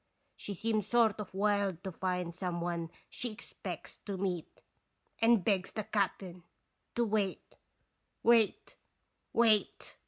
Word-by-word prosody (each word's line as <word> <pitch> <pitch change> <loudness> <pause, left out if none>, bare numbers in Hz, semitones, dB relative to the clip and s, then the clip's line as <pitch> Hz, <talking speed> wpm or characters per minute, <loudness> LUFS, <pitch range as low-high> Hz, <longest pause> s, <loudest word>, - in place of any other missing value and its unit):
She 200 - -6
seems 215 +1 0
sort 230 -3 +4
of 210 - -5
wild 200 -2 +1
to 190 - -3
find 180 -1 -2
some 175 0 -3
one 170 -1 -2 0.2
she 245 - -4
expects 215 - -8
to 200 -2 -2
meet, 180 -4 -3 0.6
and 225 -4 +5
begs 195 -3 +2
the 215 - -2
cap'n 195 -4 -1 0.5
to 235 - +3
wait 205 -3 -1 0.7
wait 230 -3 +3 0.5
wait! 225 -3 +2
200 Hz, 125 wpm, -33 LUFS, 180-220 Hz, 0.7 s, and